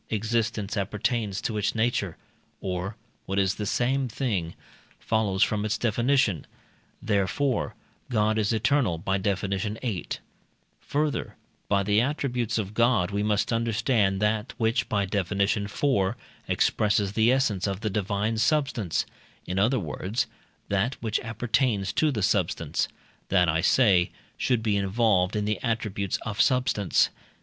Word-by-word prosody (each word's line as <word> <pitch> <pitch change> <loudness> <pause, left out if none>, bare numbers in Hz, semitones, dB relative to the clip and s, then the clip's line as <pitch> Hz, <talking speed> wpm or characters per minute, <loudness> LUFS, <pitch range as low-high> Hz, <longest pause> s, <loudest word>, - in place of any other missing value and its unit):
existence 110 -1 -1
appertains 105 0 -1
to 110 - -2
its 105 - 0
nature, 110 -6 0 0.4
or 95 +2 -3 0.3
(what 95 - -2
is 95 -1 +3
the 105 0 -4
same 130 +4 +1
thing) 105 -9 -2 0.4
follows 105 -3 +1
from 105 -1 0
its 110 0 0
definition; 120 - +1 0.6
therefore, 110 +6 0 0.3
God 110 -2 +2
is 105 -2 +1
eternal 115 - +2
(by 95 +4 -1
Def. 100 -1 0
viii.). 105 +1 -2 0.7
Further, 150 0 -2 0.3
by 100 -1 +3
the 105 +2 +3
attributes 125 -4 -1
of 105 -2 -3
God 115 -5 +2
we 100 0 -1
must 105 +2 +1
understand 115 -3 +1
that 105 +2 0
which 115 0 +1
(by 100 -2 +1
Def. 100 -1 -2
iv.) 100 +2 +1 0.3
expresses 105 -2 +1
the 110 +2 +4
essence 115 -8 +1
of 95 0 -3
the 110 - -1
divine 105 +2 -1
substance 125 - +1 0.4
in 90 +1 -2
other 120 +6 +3
words, 95 - -2 0.4
that 100 +7 +1
which 110 -1 0
appertains 115 -3 0
to 155 -1 +2
substance: 85 -6 0 0.4
that, 90 -2 +4
I 80 +1 +2
say, 95 -3 +4 0.3
should 120 -3 0
be 105 -2 +2
involved 100 -1 +2
in 105 -1 0
the 105 0 -1
attributes 105 -4 -1
of 110 -2 -1
substance. 125 -7 +2
105 Hz, 135 wpm, -26 LUFS, 100-115 Hz, 0.7 s, the